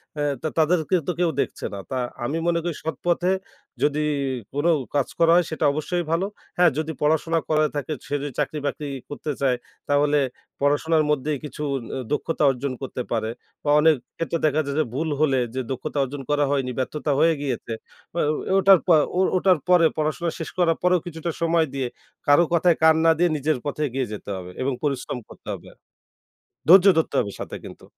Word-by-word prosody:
হ্যাঁ, 145 -1 0
তা - - -1
তাদেরকে 160 +2 +2
তো - - +2
কেউ 175 -1 +3
দেখছে - - -4
না। 100 - -5
তা 130 - -1 0.3
আমি 145 +6 -1
মনে 170 -1 +2
করি 170 -2 -2
সৎপথে 175 +3 0 0.5
যদি 150 +1 +2 0.5
কোনো 145 +4 +1 0.3
কাজ 140 -3 +2
করা 165 0 +5
হয়, 175 0 +4
সেটা 160 -1 -1
অবশ্যই 175 +4 -2
ভালো। 165 +3 +1 0.3
হ্যাঁ, 175 -2 +5
যদি 155 0 -1
পড়াশোনা 160 +2 +2
করা 155 -1 +3
থাকে, 145 +1 -2
সে - - -5
যদি 145 - -4
চাকরি-বাকরি 145 0 -2 0.2
করতে 150 +1 -4
চায়, 130 -2 +2 0.3
তাহলে 145 +1 +3 0.4
পড়াশোনার 155 +3 +2
মধ্যেই 150 +1 0
কিছু 150 0 -8 0.2
অ - - -3 0.3
দক্ষতা 155 +1 -1
অর্জন 135 +1 -3
করতে 130 -1 -4
পারে। 110 -2 0 0.3
বা 145 - -1
অনেক 160 +1 +5 0.2
ক্ষেত্রে 165 0 -1
দেখা 155 0 +3
যায় 140 0 -3
যে - - +4
ভুল 160 +5 -1
হলে 135 -4 +3 0.2
যে 130 - 0
দক্ষতা 145 +3 -4
অর্জন 135 +1 -5
করা 145 0 +2
হয়নি, 135 -3 0
ব্যর্থতা 150 +3 -2
হয়ে 165 +1 +5
গিয়েছে, 125 -4 -3 0.4
অ্যা 170 - 0
ও - - -2
এ - - 0
ওটার 195 -1 +7
পর 165 -4 +6 0.2
ও - - +3 0.2
ওটার 185 -1 +4
পরে 175 -2 +6
পড়াশোনা 155 +3 0
শেষ 165 - -4
করার 165 -2 +3
পরেও 180 0 +4
কিছুটা 165 0 -4
সময় 165 -1 +2
দিয়ে 135 -2 -1 0.4
কারো 145 +4 +6
কথায় 170 0 +4
কান 160 0 +7
না 165 - +7
দিয়ে 175 +1 +3
নিজের 150 0 0
পথে 145 +1 -3
এগিয়ে 130 0 -2
যেতে 105 - -8
হবে 90 -1 -8
এবং 135 +1 0
পরিশ্রম 140 -3 -2
করতে - - -16
হবে - - -9
আর। - - -32 0.9
ধৈর্য 190 +3 +9
ধরতে 160 - 0
হবে 105 - -2
সাথে - - -5
কিন্তু। - - -11
155 Hz, 195 wpm, -24 LUFS, 140-165 Hz, 0.9 s, ধৈর্য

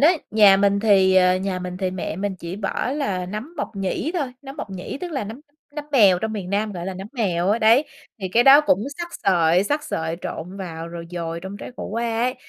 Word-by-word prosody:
ấy, 325 +3 +5
nhà 205 -3 +7
mình 200 0 +2
thì, 195 -3 +4
ờ, 180 0 +5
nhà 190 0 -2
mình 180 0 -6
thì 185 0 -1
mẹ 180 -3 -4
mình 200 +1 -2
chỉ 170 +3 -6
bỏ 205 +4 -2
là 200 -11 -2
nấm 215 - -6
mộc 225 - -5
nhĩ 195 - -2
thôi, 285 -8 -2
nấm 270 +1 -9
mộc 210 - -6
nhĩ 190 +8 -6
tức 350 -2 -5
là 265 -7 -2
nấm 225 +6 -8 0.3
nấm 300 - -5
mèo 200 -8 +6
trong 220 +2 -3
miền 195 -4 -5
Nam, 210 +1 0
gọi 175 -1 -6
là, 190 - -4
nấm 190 +2 -7
mèo 190 -7 0
á, 215 - +2
đấy. 230 +6 +5 0.4
Thì 190 - -3
cái 230 +6 +4
đó 275 +2 +9
cũng 210 -9 +1
xắt 345 - -3 0.2
sợi, 175 -1 +3
xắt 295 +7 -1
sợi 160 +1 -3
trộn 180 +5 -6
vào 165 -3 -6
rồi 170 0 -8
dồi 170 -1 -4
trong 190 +3 -7
trái - - -8
khổ - - -5
qua 230 +1 -2
ấy. 250 +1 +1
195 Hz, 245 wpm, -22 LUFS, 180-230 Hz, 0.4 s, đó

